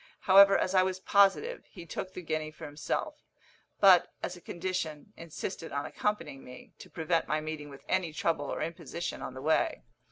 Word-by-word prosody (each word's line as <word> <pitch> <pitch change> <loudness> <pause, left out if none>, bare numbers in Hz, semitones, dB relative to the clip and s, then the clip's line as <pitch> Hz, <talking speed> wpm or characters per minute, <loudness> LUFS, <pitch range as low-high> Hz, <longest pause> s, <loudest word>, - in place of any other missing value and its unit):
However, 195 +1 +7
as 185 - 0
I 185 - +6
was 185 0 -1
positive, 200 - +3
he 175 -4 -11
took 185 +3 -5
the 180 - -6
guinea 155 -1 -2
for 155 - -10
himself; 145 +1 -4 0.6
but, 190 -3 +6
as 180 - -3
a 175 - -14
condition, 175 0 -4
insisted 165 +1 -6
on 140 0 -2
accompanying 165 -10 -3
me, 125 0 -13
to - - -12
prevent 165 0 0
my 155 +2 +1
meeting 155 -1 -6
with 140 -1 -13
any 185 -3 0
trouble 155 -1 -1
or - - -2
imposition 170 +1 -5
on 130 - -6
the 130 - -8
way. 155 - +1
165 Hz, 185 wpm, -30 LUFS, 155-185 Hz, 0.6 s, However